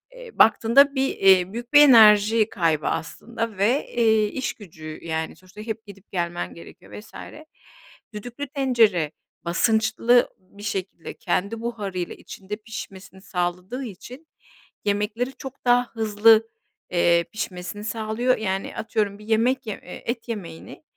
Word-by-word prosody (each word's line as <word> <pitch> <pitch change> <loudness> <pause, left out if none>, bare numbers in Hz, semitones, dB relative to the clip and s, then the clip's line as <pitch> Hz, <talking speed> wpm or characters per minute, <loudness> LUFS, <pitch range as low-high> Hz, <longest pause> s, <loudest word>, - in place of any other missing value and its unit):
Eee, - - -11
baktığında 250 +6 +5
bir 270 0 +1
eee, 190 -1 +4
büyük 235 +2 -7
bir 290 - +9
enerji 220 -4 +6
kaybı 160 -6 0
aslında 230 +6 -4
ve 230 +9 +1
eee, 220 -2 +3
işgücü 170 -10 -7
yani; 160 -1 -3
sonuçta 185 +3 -14
hep 220 0 -6
gidip, 200 0 -15
gelmen 175 -1 -3
gerekiyor 170 - -14
vs. 210 - -16 1.0
Düdüklü 245 +7 -7
tencere, 235 - +2 0.3
basınçlı 220 +6 +2
bir 190 +2 -16
şekilde, 190 -4 -5
kendi 210 +4 -2
buharıyla, 200 -7 -4
içinde, 195 +1 -8
pişmesini 195 -3 -10
sağladığı 180 +7 -3
için, 250 - -10 0.6
yemekleri 210 +5 -1
çok 265 0 -11
daha 245 0 +4
hızlı, 220 0 +4 0.4
eee, 170 -1 +3
pişmesini 205 -2 -6
sağlıyor. 225 +3 -1
Yani, 195 -2 -3
atıyorum, 210 -2 -2
bir 210 - -13
yemek 240 +3 +1
ye 215 - -5
eee, 180 - -10
et 235 0 -4
yemeğini, 175 - -8
215 Hz, 130 wpm, -23 LUFS, 190-235 Hz, 1.0 s, bir